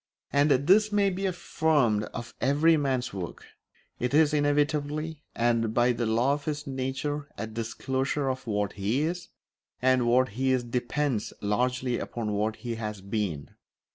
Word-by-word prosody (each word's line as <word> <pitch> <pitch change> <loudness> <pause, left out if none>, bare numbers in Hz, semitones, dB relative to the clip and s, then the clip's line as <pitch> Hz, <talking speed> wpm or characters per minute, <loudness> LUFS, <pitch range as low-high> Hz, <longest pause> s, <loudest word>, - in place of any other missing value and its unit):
And 145 +1 +4
this 185 +11 +4
may 200 -1 +3
be 195 +2 -1
affirmed 155 - +1
of 120 +1 -8
every 150 +5 +4
man's 135 -6 -1
work; 90 -4 -6 0.5
it 125 +3 0
is 155 -1 +5
inevitably, 150 +1 0
and 115 -1 +1
by 120 +1 +4
the 120 -1 -1
law 120 +5 +2
of 145 0 -4
his 150 -1 -3
nature, 140 +2 -3
a 110 - -3
disclosure 130 +5 -2
of 130 -1 -3
what 105 -2 -1
he 105 +8 0
is, 175 +2 -3 0.5
and 130 -1 +3
what 130 +2 +4
he 130 +6 0
is 125 -1 +1
depends 125 0 -1
largely 125 +4 0
upon 110 -3 -4
what 105 +1 0
he 120 0 -5
has 105 -2 -4
been. 95 -7 -3
130 Hz, 155 wpm, -28 LUFS, 115-145 Hz, 0.5 s, is